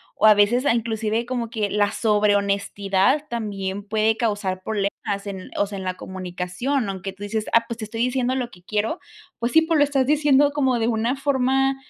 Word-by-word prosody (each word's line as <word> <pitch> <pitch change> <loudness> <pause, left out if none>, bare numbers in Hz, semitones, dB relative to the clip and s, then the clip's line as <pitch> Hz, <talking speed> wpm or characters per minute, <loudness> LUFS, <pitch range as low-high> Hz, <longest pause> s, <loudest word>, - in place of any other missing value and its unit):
o 215 - +4
a 215 - +8
veces, 235 +6 +3
a - - +4
inclusive, 225 0 -1
como 240 -2 -3
que 215 -3 -2
la 205 -1 +2
sobre 210 -2 +2
honestidad 200 +6 +1
también 205 -4 -4
puede 220 +1 +1
causar 205 -5 -1
problemas 200 0 -3
en, 190 -2 -7
o 205 - +2
sea, 200 0 -7
en - - -6
la 185 -1 -3
comunicación, 185 +8 -3
aunque 195 0 -5
tú 200 +1 -11
dices: 215 +1 -2
"Ah, 230 0 +4
pues 235 - -5
te - - -5
estoy 225 +2 -5
diciendo 250 +1 0
lo 250 -2 -2
que 180 - -17
quiero". 215 - -1 0.4
Pues, 235 +1 -1
sí, 320 +4 +5
pero 320 -2 +1
lo - - +6
estás 275 -2 +1
diciendo 290 -1 +4
como 265 -4 +1
de 225 - +1
una 230 +2 0
forma, 270 -1 +1
220 Hz, 205 wpm, -23 LUFS, 200-255 Hz, 0.4 s, a